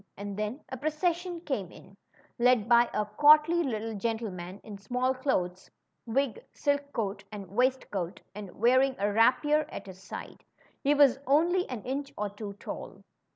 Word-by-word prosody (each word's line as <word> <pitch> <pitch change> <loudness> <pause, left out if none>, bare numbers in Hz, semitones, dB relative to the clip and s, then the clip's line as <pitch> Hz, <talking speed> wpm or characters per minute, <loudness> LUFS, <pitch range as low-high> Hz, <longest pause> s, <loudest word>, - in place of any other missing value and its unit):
And 200 0 -5
then 215 +7 -3
a 260 - -5
procession 340 +4 -1
came 220 - -3
in, 195 - -15 0.4
led 240 -3 +4
by 235 0 +5
a 210 - 0
courtly 300 +9 +5
little 225 -6 -2
gen 225 +2 -1
tleman 185 -4 -7
in 205 -2 -9
small 250 +5 0
clothes, 185 -9 -2 0.4
wig, 250 0 -1
silk 285 0 -1
coat, 205 -5 -3
and 200 -4 -8
waist 255 +4 +1
coat, 180 -3 -3
and 205 -1 -7
wearing 260 +3 +4
a 205 +1 0
rapier 260 +7 +3
at 200 - -7
his 190 -1 -11
side. - - -9 0.4
He 290 +1 +3
was 275 -3 +5
only 345 +6 +3
an 245 -5 -5
inch 275 +2 -4
or 205 -1 -2
two 205 0 -7
tall. 200 - -8
240 Hz, 165 wpm, -29 LUFS, 205-285 Hz, 0.4 s, by